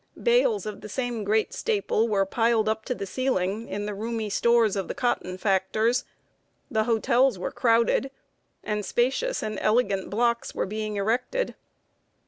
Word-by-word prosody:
Bales 480 -3 +2
of 215 -1 -6
the 210 - -9
same 240 -1 -3
great 215 +2 +1
staple 405 - 0
were 200 -3 +2
piled 225 +1 +1
up 220 0 -1
to 250 - -2
the 200 - -5
ceiling 215 -2 -1
in 205 +1 -4
the 210 - -3
roomy 220 +1 -3
stores 235 -2 +3
of 195 -2 -2
the - - -4
cotton 185 -7 -1
factors; 215 +5 +1 0.7
the 220 -2 +1
hotels 240 +1 +2
were 180 - -4
crowded, 235 +3 +2 0.5
and 210 0 -2
spacious 270 - 0
and 215 -2 -3
elegant 210 -4 +1
blocks 235 +2 0
were - - 0
being 215 +1 -4
erected. 245 - -1
220 Hz, 155 wpm, -26 LUFS, 205-245 Hz, 0.7 s, stores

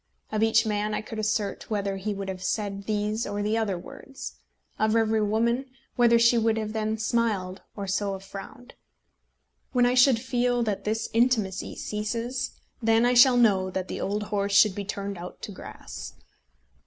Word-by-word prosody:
Of 215 0 0
each 225 0 +4
man 210 0 -1
I - - -2
could 220 +1 -6
assert 215 -1 -1
whether 200 -2 -1
he 205 +2 -3
would 195 0 -5
have 185 -1 -5
said 200 0 -2
these 210 +2 -1
or 205 0 -2
the 210 +1 +1
other 215 -5 0
words; 70 - -9 0.4
of 215 +1 +2
every 220 -1 +2
woman, 230 +5 +1 0.3
whether 235 -1 +5
she 235 0 +5
would 225 0 +2
then 215 0 -2
have 220 - -4
smiled 205 -5 0
or 200 - -4
so 195 +1 -1
have 195 0 -7
frowned. 225 +7 -10 1.0
When 245 -1 +4
I 245 - +3
shall 255 0 +6
feel 245 0 0
that 210 -3 -2
this 220 +1 -1
intimacy 225 -5 +1
ceases, 235 +4 -3 0.3
then 225 +1 +4
I 245 - +3
shall 250 +1 +7
know 195 -6 +4
that 185 0 -4
the - - -4
old 205 +2 -1
horse 200 -1 -1
should 210 -1 +6
be 200 +1 -5
turned 200 -1 -4
out 180 +1 -8
to - - -5
grass. 185 - -9
215 Hz, 180 wpm, -26 LUFS, 200-230 Hz, 1.0 s, shall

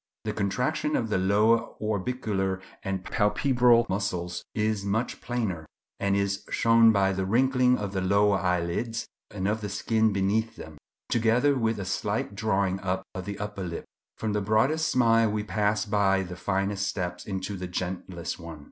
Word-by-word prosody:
The - - -2
contraction 125 +10 -1
of 115 - -1
the 105 - +1
lower 105 +5 +4 0.2
orbicular 105 -3 -1 0.2
and 95 -1 -3
palpebral 120 +1 +3
muscles 90 -3 -2
is 105 -1 0
much 110 +5 -2
plainer, 105 -10 -3 0.3
and 100 0 +1
is 100 0 0
shown 115 0 +5
by 95 -2 +2
the 95 0 -1
wrinkling 125 +4 +3
of 100 -2 -4
the 95 - -1
lower 100 +1 +3
eyelids 90 +6 -1 0.2
and 95 -2 -3
of 110 +2 0
the 105 - -4
skin 110 +2 +1
beneath 105 +4 0
them, 80 -2 -11 0.3
together 120 +5 +3
with 115 -4 0
a 100 - -4
slight 100 +2 -2
drawing 100 -2 0
up 95 0 -2
of 95 0 -6
the 100 -1 -5
upper 105 -1 -5
lip. 85 -2 -5 0.3
From 110 -2 -2
the 105 - 0
broadest 135 +10 +2
smile 115 -2 +4
we 105 0 -1
pass 105 0 0
by 100 -2 +2
the 90 -1 -7
finest 100 +1 -1
steps 90 -3 -4
into 95 0 -3
the 90 -1 -5
gentlest 90 -1 -4
one. 85 -2 -9
100 Hz, 165 wpm, -27 LUFS, 95-115 Hz, 0.3 s, shown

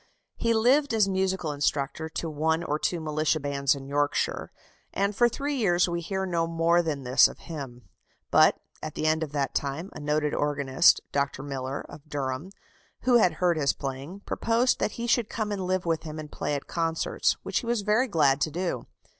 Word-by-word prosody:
He 230 - 0
lived 255 +4 +3
as 210 -3 +4
musical 190 -4 0
instructor 145 +2 -1
to 165 - -4
one 160 +2 0
or 150 -2 -1
two 175 - -1
militia 155 0 0
bands 140 -1 +1
in 135 -1 -8
Yorkshire, 145 +1 -1 0.4
and 200 +1 0
for 240 +2 +4
three 285 +5 -3
years 185 -10 +2
we 170 0 -2
hear 190 +3 -2
no 170 -2 0
more 165 +1 +3
than 150 -5 -3
this 125 +1 +6
of - - -11
him. 130 -6 -7 0.5
But, - - +5 0.2
at 155 - -6
the 155 - -2
end 155 +1 +2
of 155 -3 -3
that 140 -2 -1
time, 145 +7 -3
a - - -8
noted 150 0 0
organist, 145 +1 +3
Dr. 140 -1 -1
Miller, 135 -1 -4
of 150 +1 -13
Durham, 140 +3 -3 0.5
who 250 -1 +5
had 180 -6 +4
heard 175 0 +1
his 140 -3 +2
playing, 140 +8 -6
proposed 230 +4 +1
that 210 - -1
he 235 - -4
should 235 -2 +2
come 215 -2 -3
and 190 -3 -3
live 185 -1 0
with 165 -1 0
him 155 -1 -7
and 155 -1 -7
play 145 - -2
at 140 - -5
concerts, 165 -1 0
which - - 0
he 235 - -8
was 235 -2 +1
very 215 +5 +2
glad 150 - +3
to - - +2
do. 175 +3 -3
160 Hz, 200 wpm, -27 LUFS, 145-190 Hz, 0.5 s, this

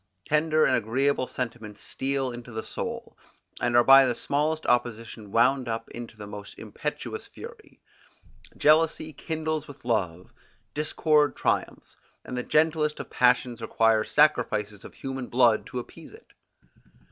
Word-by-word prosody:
Tender 155 +1 +2
and 130 - +3
agreeable 130 +4 0
sentiments 115 -4 -6
steal 135 -1 -2
into 120 0 -9
the 110 0 -5
soul, - - -6 0.5
and 120 -1 +2
are 120 - +6
by 135 +1 +8
the 120 - 0
smallest 155 +5 -1
opposition 115 -3 -1
wound 130 +3 +3
up 115 0 -4
into 120 -2 -9
the 105 - -8
most 105 -1 -9
impetuous 150 - -5
fury: 465 -2 -12 0.8
Jealousy 155 0 +3
kindles 155 0 -3
with 140 -3 -13
love; 90 -7 -2 0.4
discord 150 0 +2
triumphs; - - -2 0.3
and 125 - -6
the 125 - -1
gentlest 155 +2 +1
of - - -8
passions 125 -1 +2
requires 115 -1 +2
sacrifices 110 -9 +2
of - - -12
human 135 -2 -5
blood 120 -3 +3
to - - -7
appease 125 - -9
it. - - -20
125 Hz, 140 wpm, -26 LUFS, 115-150 Hz, 0.8 s, by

